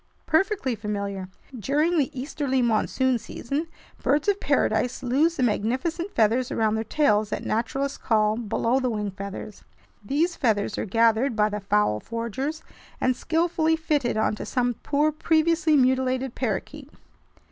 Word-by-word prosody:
"Perfectly 330 - +1
familiar. 200 -3 -4 0.3
During 295 - +1
the 275 - +1
easterly 265 -1 -1
monsoon 240 +2 +1
season, 285 +8 -4 0.3
birds 290 +5 +1
of 405 -1 +2
paradise 250 +1 0
lose 290 +7 +2
the 260 - 0
magnificent 260 - -1
feathers 230 +3 +2
around 220 -1 +1
their 220 0 -1
tails 215 -5 +2
that - - -4
naturalists 270 +5 -1
call 215 -2 +2
'below 230 +2 0
the 255 -1 0
wing' 210 -3 -2
feathers. 200 +2 -8 0.4
These 315 - 0
feathers 215 -6 0
are - - -2
gathered 230 +4 +2
by 210 -1 +3
the 210 0 -3
fowl 200 - +1
forgers 235 - -4 0.4
and 255 0 +2
skillfully 320 +1 +1
fitted 295 -7 0
onto 215 0 0
some 245 -1 0
poor 295 +5 0
previously 315 0 +2
mutilated 260 -1 +1
parakeet. 265 +5 -4
255 Hz, 140 wpm, -25 LUFS, 215-300 Hz, 0.4 s, by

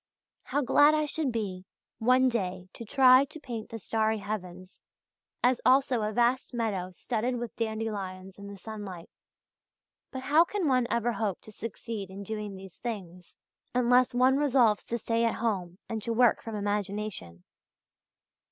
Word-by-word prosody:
"How 290 - 0
glad 290 +4 +5
I 305 0 +1
should 295 -2 -1
be, 190 -5 -4 0.3
one 255 +3 +4
day 185 -6 -2
to - - -8
try 255 +3 +6
to 310 +3 -11
paint 235 -6 -6
the 225 - -6
starry 220 +1 0
heavens, 185 -3 -6 0.6
as 250 0 +3
also 260 -2 +4
a 210 0 -1
vast 245 +3 +1
meadow 205 -6 -1
studded 235 +6 -2
with 240 -1 -5
dandelions 205 -4 -4
in 200 - -9
the 200 0 -9
sunlight. 195 -5 -8 1.0
But 260 -1 -6
how 305 +4 +5
can 370 -1 -2
one 255 -3 +2
ever 235 +1 +1
hope 215 -5 -2
to 215 - -13
succeed 215 -1 -6
in 195 +1 -8
doing 210 -1 -5
these 190 -1 -12
things 180 -7 -7 0.4
unless 250 0 +4
one 260 +2 +4
resolves 255 -7 +3
to 235 - -2
stay 230 0 0
at 230 - +1
home 190 -6 -2
and 220 -1 -4
to 230 +2 -2
work 240 0 +4
from 225 -1 -6
imagination?" 205 - -3
225 Hz, 160 wpm, -29 LUFS, 200-250 Hz, 1.0 s, try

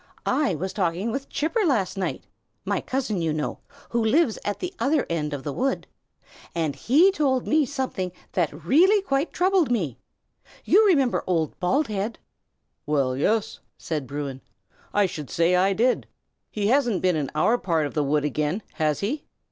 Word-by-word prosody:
I 245 - +1
was 190 +5 -4
talking 190 +3 -1
with 275 +3 -4
Chipper 375 +9 0
last 215 - +1
night, 190 -2 -3 0.4
my - - 0
cousin, 245 -8 -2
you 165 -1 0
know, 150 0 -3 0.3
who 235 -1 0
lives 245 +1 +2
at 205 - -2
the 360 +1 -5
other 290 0 +2
end 150 -3 -1
of 145 -2 -5
the 145 - -3
wood, 270 - -1 0.7
and 160 -4 -1
he 300 - +4
told 275 -8 +1
me 305 -2 +2
something 255 -10 -3 0.2
that 160 -3 -2
really 380 - +5
quite 280 -3 0
troubled 365 -4 +2
me. 175 - -1 0.7
You 430 +2 +5
remember 275 -10 +3
old 165 -4 0
Baldhead?" 215 0 0 0.7
"Well, 135 -4 +1
yes!" 210 +10 0 0.2
said 150 -5 -4
Bruin, 140 -1 -5 0.5
"I 205 -1 +3
should 150 -6 -5
say 170 +2 +2
I 190 +2 +3
did. 235 +6 +1 0.4
He 210 -1 -3
hasn't 240 -4 +2
been 180 -2 +3
in 145 -3 -1
our 225 +10 +3
part 165 -4 0
of 145 - -5
the 150 - +1
wood 145 +1 +1
again, 150 - -1
has 155 -3 +1
he?" 265 +9 -2
200 Hz, 170 wpm, -25 LUFS, -, 0.7 s, really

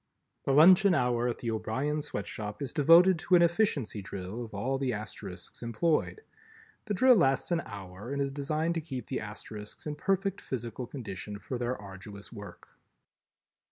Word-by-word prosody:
The - - +2
luncheon 180 +5 +7
hour 125 -2 +1
at 120 - -2
the 115 - -3
O'Brien 135 +7 -1
Sweatshop 105 -6 -5
is 140 -4 -4
devoted 170 +4 +6
to 180 - +3
an 175 - +6
Efficiency 165 - +1
Drill 95 +4 -6
of 115 - -9
all 130 +7 -1
the 130 -2 0
Asterisks 110 0 -7
employed. 150 - 0 0.6
The 210 -2 -1
Drill 255 +6 +6
lasts 135 - +2
an 170 -1 +2
hour 100 +3 -8
and 140 - -2
is 140 -1 0
designed 155 +4 -1
to 165 - -2
keep 135 -5 -6
the 130 - -3
Asterisks 105 0 -7
in 150 - -2
perfect 195 +4 -1
physical 120 -1 -5
condition 105 -5 -6
for 125 +4 -5
their 125 0 -2
arduous 100 +2 -10
work. 100 -5 -10
130 Hz, 165 wpm, -30 LUFS, 105-160 Hz, 0.6 s, luncheon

